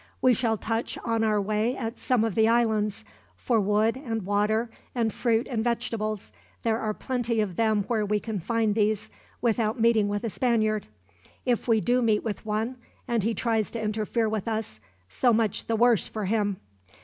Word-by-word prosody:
"We 255 -1 +5
shall 230 -2 +1
touch 225 +2 -2
on 230 -1 +1
our 215 -1 +2
way 215 +4 0
at 225 -1 -4
some 250 -4 +2
of 225 -3 0
the 220 +2 +4
islands, 220 -2 +1 0.3
for 235 -3 +1
wood 210 +3 +2
and 230 -6 -4
water 210 +3 +1 0.2
and 230 -3 0
fruit 230 -1 +1
and 225 -4 -1
vegetables. 215 -3 -2 0.3
There 225 -1 +1
are 215 -2 -1
plenty 245 -3 -1
of 200 -5 -1
them 220 -1 +2
where 220 +1 0
we 210 0 +1
can 215 -2 -4
find 225 +3 +1
these, 210 -1 0 0.3
without 225 0 +1
meeting 225 -2 +4
with 205 +1 -2
a 230 - -2
Spaniard. 215 -4 +1 0.6
If 245 -2 0
we 225 -2 +4
do 245 +3 +2
meet 220 -3 +2
with 215 -1 -4
one, 220 +4 -1 0.3
and 235 -2 +1
he 225 +3 0
tries 225 -3 0
to 230 - -3
interfere 220 +1 0
with 215 -1 -2
us, 220 - -3 0.3
so 240 - +2
much 220 -2 0
the 230 - +1
worse 235 -1 +4
for 215 -2 -4
him. 205 -1 0
220 Hz, 185 wpm, -27 LUFS, 210-230 Hz, 0.6 s, We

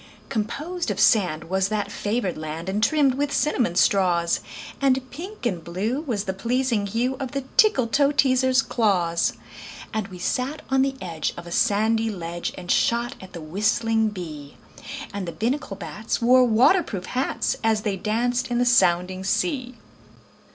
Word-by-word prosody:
Composed 300 +10 -3
of 200 -1 -2
sand 190 -6 +3
was 190 +2 0
that 210 0 -2
favored 205 -3 -2
land, 155 +2 -6
And 205 +2 -1
trimmed 290 -2 +3
with 285 +2 -1
cinnamon 245 - +1
straws; 175 -3 +3 0.4
And 265 -1 +2
pink 365 +5 -8
and 180 -8 -1
blue 210 - -2
was 235 -10 -2
the 190 - -3
pleasing 235 0 0
hue 240 +6 -1
Of 265 -2 -5
the 275 -1 -2
Tickletoeteaser's 270 - +3
claws. 180 -7 +1 0.6
And 215 -2 -2
we 185 -2 -10
sat 270 - -2
on 265 0 +4
the 270 0 0
edge 165 -4 -3
of 170 - -8
a 170 - -9
sandy 225 +3 +2
ledge 175 -4 -4
And 180 -1 -4
shot 235 +2 +1
at 190 0 -12
the 170 - -7
whistling 220 +6 +1
bee; 155 -8 -8 0.6
And 200 -3 -4
the - - -3
Binnacle 235 - -2
bats 215 +2 -4
wore 250 +2 +5
water 245 - +5
proof 195 - -6
hats 255 +2 -1
As 220 -1 +2
they 205 -3 -1
danced 235 +6 -1
in 240 - 0
the 245 - +2
sounding 185 -5 +3
sea. 255 - -1
220 Hz, 160 wpm, -24 LUFS, 185-255 Hz, 0.6 s, wore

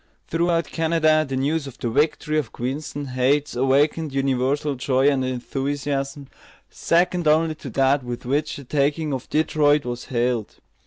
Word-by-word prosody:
Throughout 170 0 +1
Canada 160 -1 +2
the 135 - -2
news 140 +3 0
of 135 -1 -10
the 125 - -3
victory 150 +3 +1
of 135 -7 -5
Queenston 140 +3 -4
Heights 135 +3 +1
awakened 140 +3 +1
universal 135 +2 0
joy 130 +1 +1
and 135 -2 +1
enthusiasm, 135 +2 -3 0.4
second 175 0 +1
only 160 +1 +3
to 150 -3 -9
that 135 +3 +2
with 120 -1 -6
which 145 +4 -1
the 140 - -9
taking 145 +3 0
of 130 - -5
Detroit 150 -2 +2
was 120 0 -5
hailed. 120 -3 -1
140 Hz, 150 wpm, -23 LUFS, 130-155 Hz, 0.4 s, only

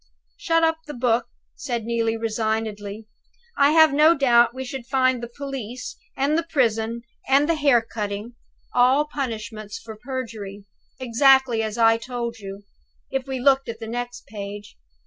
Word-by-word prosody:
"Shut 330 0 +1
up 320 0 +2
the 295 - -7
book," 240 -1 +1 0.3
said 240 -4 -4
Neelie, 230 -1 0
resignedly. 220 -2 -3 0.5
"I 280 0 +5
have 315 -2 +6
no 310 +3 +5
doubt 240 -4 +5
we 260 +1 -6
should 250 -1 -7
find 260 -2 +2
the 235 - -6
police, 255 -3 -6 0.2
and 280 +3 +1
the 335 0 -1
prison, 230 -3 0 0.2
and 275 +2 +4
the 335 - +3
hair 280 -7 +3
cutting 210 +1 -5 0.4
all 255 +4 +4
punishments 220 -7 -5
for 220 -1 -10
perjury, 215 -5 -6 0.3
exactly 260 -1 +4
as 220 0 -3
I 225 -1 +5
told 235 -1 -5
you! 195 0 -8 0.5
if 265 -1 -2
we 265 -1 -3
looked 270 0 +3
at 230 - -5
the 225 - -6
next 245 +2 -5
page. 205 0 -8
240 Hz, 155 wpm, -23 LUFS, 225-270 Hz, 0.5 s, have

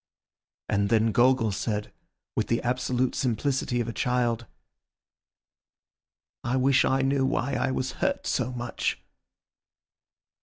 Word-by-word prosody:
And 100 -1 +1
then 110 0 +3
Gogol 120 -2 +3
said, 105 +1 -3 0.4
with - - 0
the 115 - 0
absolute 125 0 0
simplicity 130 +1 0
of 115 - -3
a 115 - -4
child— 120 -2 0 2.0
"I 125 +2 0
wish 135 +1 +4
I 135 0 +2
knew 135 0 +2
why 135 0 0
I 130 - 0
was 130 0 -1
hurt - - 0
so 125 - 0
much." 120 -1 -3
125 Hz, 120 wpm, -27 LUFS, 115-130 Hz, 2.0 s, wish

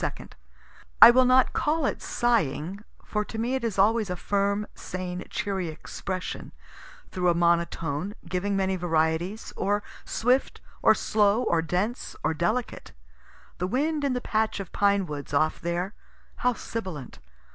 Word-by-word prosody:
2) - - -4 0.7
I - - +12
will 255 +1 +5
not 255 0 +4
call 310 0 +1
it - - -1
sighing, 195 - 0 0.3
for 210 -1 -1
to 220 - -8
me 235 +3 -1
it 265 -2 -1
is 225 -4 -2
always 215 +1 +3
a 180 - -2
firm, 200 +2 0
sane, 180 -1 -5
cheery 190 -3 -2
expression, 180 +3 -6 0.6
through 180 -1 +1
a 170 - +3
monotone, 170 +1 0
giving 190 +3 -1
many 190 -1 +1
varieties, 170 +3 -1
or 205 +2 0 0.2
swift 250 +4 +1 0.2
or - - +6
slow, 210 +2 +2
or 170 -8 +2
dense 180 +9 -2
or - - +1
delicate. 175 - -2 0.7
The 180 - 0
wind 295 +7 0
in 275 -2 +1
the 250 - -2
patch 220 -2 0
of 195 -4 -7
pine 200 -1 +3
woods 145 -2 -5
off 155 +2 +1
there 175 +4 -2 0.4
how 250 0 +2
sibilant. 185 - -6
195 Hz, 150 wpm, -26 LUFS, 170-225 Hz, 0.7 s, I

